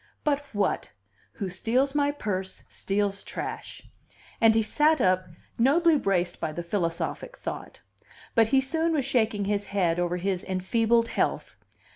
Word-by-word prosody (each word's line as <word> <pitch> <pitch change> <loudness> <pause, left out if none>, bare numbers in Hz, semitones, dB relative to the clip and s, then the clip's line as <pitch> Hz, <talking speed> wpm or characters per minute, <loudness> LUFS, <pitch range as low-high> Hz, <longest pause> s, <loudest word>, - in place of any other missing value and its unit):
"But 290 -2 +1
what! 205 -2 0 0.4
'Who 200 - -4
steals 240 +9 0
my 285 -1 +2
purse 190 -9 -4
steals 200 0 -1
trash.'" - - -6 0.6
And 225 -1 +6
he 225 - +3
sat 305 +8 +3
up, 185 0 +2 0.3
nobly 320 +7 +5
braced 185 -9 0
by 160 - -2
the 175 - -4
philosophic 175 - -3
thought. - - -7 0.5
But 225 -1 +5
he 265 +2 +4
soon 320 +5 0
was 285 -5 0
shaking 220 -5 +1
his 205 0 0
head 175 -4 0
over 175 0 0
his 185 0 -1
enfeebled 225 +5 +1
health. - - -1
210 Hz, 145 wpm, -27 LUFS, 185-270 Hz, 0.6 s, And